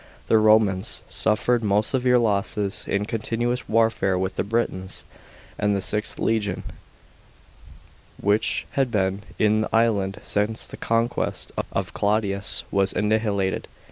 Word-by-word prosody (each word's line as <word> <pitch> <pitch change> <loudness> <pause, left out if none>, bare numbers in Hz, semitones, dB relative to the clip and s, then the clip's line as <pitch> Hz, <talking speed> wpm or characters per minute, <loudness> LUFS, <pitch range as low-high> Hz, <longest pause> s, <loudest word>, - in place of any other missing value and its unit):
f - - -30
The 110 - +5
Romans 110 -1 +3
suffered 110 +4 +2
most 105 +1 +2
severe 125 -1 +3
losses 105 -3 0
in 100 +1 0
continuous 120 +3 -2
warfare 110 -4 +2
with 95 +1 -1
the - - 0
Britons,f 100 -4 -2 0.5
and 105 -1 +2
the - - 0
IXth 105 +2 -1
legion, 105 -4 -1 1.6
which 100 +2 +1
had 135 -2 +1
been 95 -3 0 0.2
in 110 0 +3
the - - -2
island 105 -4 +1
since 105 +2 -1
the - - -9
conquest 115 +1 -1 0.2
of - - -3
Claudius, 100 -1 0
was 95 -1 +1
annihilated. 105 -3 0
105 Hz, 130 wpm, -24 LUFS, 100-115 Hz, 1.6 s, The